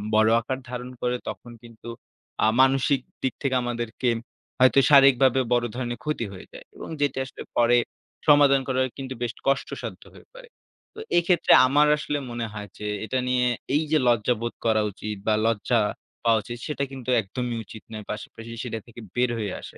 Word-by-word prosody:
বড় 110 0 +5
আকার 130 +3 -3
ধারণ 125 0 -5
করে 125 0 0
তখন 120 - -8
কিন্তু 115 0 -14 0.6
আ - - +5
মানসিক 135 +1 +3 0.2
দিক 130 - 0
থেকে 130 -1 +1
আমাদেরকে 120 0 -2 0.5
হয়তো 130 +1 +6
শারীরিকভাবে 135 -2 +6
বড় 120 0 +2
ধরনের 120 -1 -4
ক্ষতি 150 -6 -2
হয়ে 95 - -10
যায় - - -11
এবং - - -9
যেটা 140 -2 +1
আসলে 130 - -11 0.2
পরে 120 0 +5 0.5
সমাধান 145 -2 +6
করা 130 -1 0 0.2
কিন্তু 130 -1 -5
বেশ 120 -2 -1 0.2
কষ্টসাধ্য 135 0 -2
হয়ে - - -16
পড়ে। - - -13 0.5
তো - - -9 0.2
এক্ষেত্রে 175 -1 +4
আমার 145 +3 +4
আসলে 150 -1 -2
মনে 120 -1 -3
হয় 105 -1 -7
যে, 105 - -5 0.2
এটা 120 +5 -2
নিয়ে 125 0 +2 0.3
এইযে 155 +1 +2
লজ্জাবোধ 120 0 +1
করা 110 -1 +3
উচিত, 105 +2 -6
বা 110 - +4
লজ্জা 115 +1 +1 0.4
পাওয়া 115 -1 +4
উচিত 120 - -7
সেটা 150 -2 -2
কিন্তু 130 -2 -7
একদমই 120 +3 -4
উচিত 110 - -11
নয়। 110 -1 -6
পাশাপাশি 115 +2 -8
সেটা 115 -3 -4
থেকে 120 0 -12
বের 125 0 +2
হয়ে 105 -3 -3
আসা। - - -11
125 Hz, 175 wpm, -25 LUFS, 115-135 Hz, 0.6 s, হয়তো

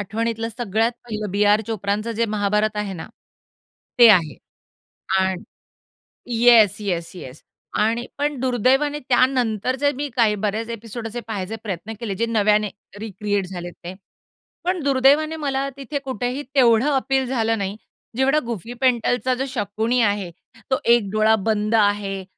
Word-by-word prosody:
आठवणीतलं 225 +3 -2
सगळ्यात 225 +1 0
पहिलं 215 -3 -5
बी.आर. 205 +2 +3
चोप्राचं 215 +1 -2
जे 230 +1 0
महाभारत 210 +1 0
आहे 210 -2 -2
ना 170 - -7 0.9
ते 240 -1 +9
आहे. 165 -7 +3 0.8
आणि 190 -1 0 1.0
येस, 230 -4 +6
येस, 175 -5 -3
येस 135 -5 -10 0.4
आणि 225 +3 +1
पण 290 -1 -1
दुर्दैवाने 260 +4 +1
त्यानंतरचे 255 +1 +2
मी 290 +2 -3
काही 225 -4 +3
बरेच 215 +2 -1
एपिसोड 230 0 -6
असे 240 +2 -5
पाहायचे 205 0 -4
प्रयत्न 205 +1 -5
केले 220 -5 -3
जे 230 - 0
नव्याने 210 -2 +2 0.3
रिक्रिएट 205 -2 -2
झालेत 175 -1 -7
ते. 175 +2 -6 0.7
पण 360 -1 -1
दुर्दैवाने 280 +3 +3
मला 275 -3 -2
तिथे 275 +1 -4
कुठेही 255 +2 -3
तेवढं 240 0 +4
अपील 270 -1 +1
झालं 225 -3 0
नाही. 200 -1 -3 0.4
जेवढा 270 +3 +3
गुफी 230 0 -5
पेंटलचा 250 0 +1
जो 265 +2 -2
शकुणी 225 0 -1
आहे, 205 -4 0 0.4
तो 260 - +2
एक 235 -4 +4
डोळा 215 +1 +3
बंद 215 +1 0
आहे 205 -2 +1
225 Hz, 140 wpm, -22 LUFS, 205-255 Hz, 1.0 s, ते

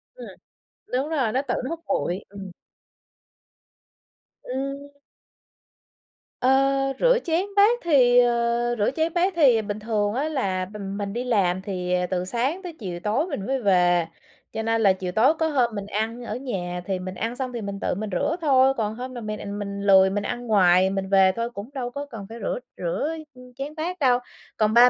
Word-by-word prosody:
Ừm. - - -9 0.7
Đúng 270 +4 0
rồi, 265 -9 0
nó 260 - +1
tự 245 - 0
nó 255 - -3
hút 330 0 -4
bụi. 180 +3 -1
Ừm. 195 -2 -9 1.9
Ừm. 275 +2 -4 1.5
Ơ, 255 - +3 0.5
rửa - - +4
chén 340 +3 0
bát 435 +4 +5
thì 255 -7 +5
ờ, 240 0 +2
rửa 205 +4 +1
chén 320 +1 0
bát 360 +2 +2
thì 260 -9 +5
bình 205 0 -4
thường 210 -1 0
á 290 +5 -1
là 190 -11 -1
mình 200 0 -6
mình 200 -1 -3
đi 245 +1 -2
làm 190 -7 +1
thì, 180 -2 -3
ờ, 180 0 +1
từ 180 -1 -2
sáng 260 - -1
tới 350 -2 -6
chiều 180 -4 -5
tối 215 - 0
mình 245 - -4
mới 270 -1 -1
về. 175 -4 +3 0.5
Cho 220 - -3
nên 225 0 +1
là 195 -3 +5
chiều 185 -1 -5
tối 230 - +4
có 320 - +2
hôm 250 -7 +1
mình 200 -1 -4
ăn 225 +4 -3
ở - - -4
nhà 180 -9 -4
thì 190 -2 -2
mình 185 0 -6
ăn 230 +4 -3
xong 255 -1 -4
thì 235 - -4
mình 200 -1 -5
tự - - -1
mình 210 +1 -4
rửa 240 - 0
thôi. 270 -3 +4
Còn 215 -1 -1
hôm 255 +1 -6
mà 240 - -6
m 215 -1 -4
à, 215 - -6
mình 200 0 -5
lười 190 -1 +6
mình 205 +1 -2
ăn 245 +2 -4
ngoài, 185 -3 +5
mình 195 0 -3
về 190 -1 +5
thôi 230 +1 -2
cũng 205 +2 -8
đâu 245 -2 -4
có 285 +2 -5
cần 225 -8 -9
phải 230 - -8
rửa - - -2 0.2
rửa, 325 - -2 0.2
ư, 250 - -15
chén 280 +3 -6
bát 345 +3 -4
đâu. 250 -3 +4 0.4
Còn 215 0 +2
ba 245 +1 +8
230 Hz, 205 wpm, -24 LUFS, 195-270 Hz, 1.9 s, ba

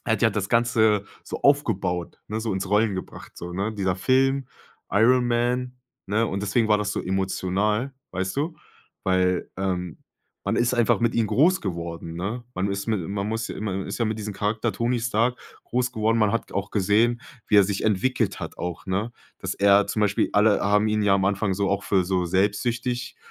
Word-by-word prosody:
er 115 - +1
hat - - -4
ja 115 - +5
das 100 -1 -2
Ganze 110 -3 +3 0.2
so - - -6
aufgebaut, 95 - +1
ne, 110 +1 -3
so 110 -2 -2
ins 95 0 -3
Rollen 105 -1 +3
gebracht, 95 - -8
so, 90 +1 -7
ne? 100 +4 -1
Dieser 95 -3 0
Film, 135 +4 +2 0.4
Iron 125 +4 +4
Man, 125 +1 0 0.3
ne? 110 +3 +1
Und 100 +1 -3
deswegen 110 +3 +1
war 105 0 +4
das 105 - -2
so - - -2
emotional, 95 +6 -1 0.2
weißt 95 +5 -3
du? 160 +4 -1 0.5
Weil, 90 -1 +1
ähm, 90 -3 -2 0.5
man - - 0
ist 120 +1 +2
einfach 120 -1 +2
mit 120 -1 +1
ihn 115 -2 +2
groß 170 - +3
geworden, 85 -3 -5
ne? 105 +8 -4
Man 100 +2 -1
ist 100 +2 -3
mit 110 -3 +1
man 100 0 -2
muss 110 0 -2
man 95 -2 -3
ist - - -4
ja 115 - +1
mit 110 0 -2
diesem 105 -1 -5
Charakter 105 +3 -1
Tony 120 +1 0
Stark 120 +1 +1 0.3
groß 125 0 -1
geworden. 110 0 +1
Man 105 -1 +3
hat 115 - -2
auch 100 0 -3
gesehen, 110 +4 +2 0.3
wie 105 - +4
er 100 - +8
sich 100 0 -2
entwickelt 110 +5 +1
hat - - -7
auch, 90 -1 -5
ne? 100 +5 -1 0.3
Dass - - -3
er 100 0 +4
zum 110 - -1
Beispiel 105 -1 +2
alle 105 0 +4
haben 105 +1 +3
ihn 105 0 +1
ja 100 -1 +4
am 95 -1 +1
Anfang 100 0 0
so 100 +1 0
auch 100 0 0
für 95 -2 +2
so 90 -1 0
selbstsüchtig, 115 +7 -1
105 Hz, 200 wpm, -24 LUFS, 95-115 Hz, 0.5 s, er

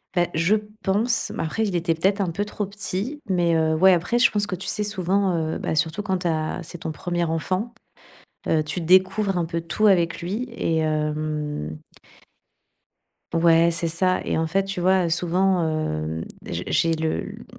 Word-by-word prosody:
Bah, 175 -1 +3
je 170 +7 +3 0.3
pense, 220 +5 +1
mais - - -3
après 190 +8 -1
il 195 - -2
était 165 -1 +1
peut-être 195 +5 +1
un 180 - 0
peu 200 +5 -2
trop 210 -1 -4
petit, 210 +7 -4
mais, 175 -3 +2
heu, 160 0 +2
ouais 185 +3 +6
après 180 +8 +1
je 240 - +6
pense 205 -1 0
que 195 - -5
tu 185 - -7
sais 210 - -1
souvent, 195 -2 0 0.2
heu, - - -2
bah, - - -3
surtout 160 +6 0
quand 190 -2 -1
tu 180 - -2
as 155 -1 -1
c'est 170 +2 -8
ton 160 - -4
1er 175 +2 -2
enfant, 185 +8 -2 0.8
heu, 155 -1 +3
tu 155 +4 -3
découvres 185 +3 +3
un 175 - +1
peu 165 0 -3
tout 175 +6 +1
avec 170 -4 +2
lui 200 +8 -2
et 230 -9 -2
hem 150 - -2 1.6
Ouais, 165 0 +5
c'est 170 0 -1
ça, 185 +3 +1
et - - -1
en 160 - +1
fait, 195 +4 +1
tu 195 -2 -4
vois, 185 0 +3
heu, - - -1
souvent 180 +1 +1
hem, 80 - -2 0.2
j'ai 85 +1 -4
j'ai 165 0 +2
le 160 0 -1
l - - -7
mmh, - - -12
175 Hz, 200 wpm, -23 LUFS, 160-195 Hz, 1.6 s, ouais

